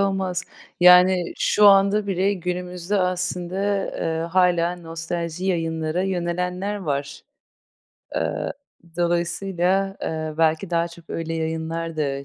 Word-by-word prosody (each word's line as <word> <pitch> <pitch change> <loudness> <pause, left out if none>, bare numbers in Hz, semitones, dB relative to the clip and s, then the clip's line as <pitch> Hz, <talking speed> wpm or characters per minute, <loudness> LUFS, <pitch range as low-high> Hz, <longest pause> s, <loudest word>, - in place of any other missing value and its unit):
olmaz. 190 -2 0 0.4
Yani, 180 0 +7
şu 210 - +4
anda 200 +1 +5
bile 195 +1 +1
günümüzde 180 +1 -3
aslında, 180 0 -2 0.4
eee, 160 0 -1
hâlâ 175 0 +2
nostalji 170 +1 -5
yayınlara 165 -2 -1
yönelenler 180 +2 -2
var. 145 -7 -4 0.9
Aaa, - - -1 0.5
dolayısıyla, 180 +2 0
eee, 155 -1 -3
belki 160 +3 +2
daha 170 0 +1
çok 170 0 -15
öyle 165 0 -3
yayınlar 160 0 -3
da 140 -2 -2
175 Hz, 110 wpm, -23 LUFS, 165-185 Hz, 0.9 s, Yani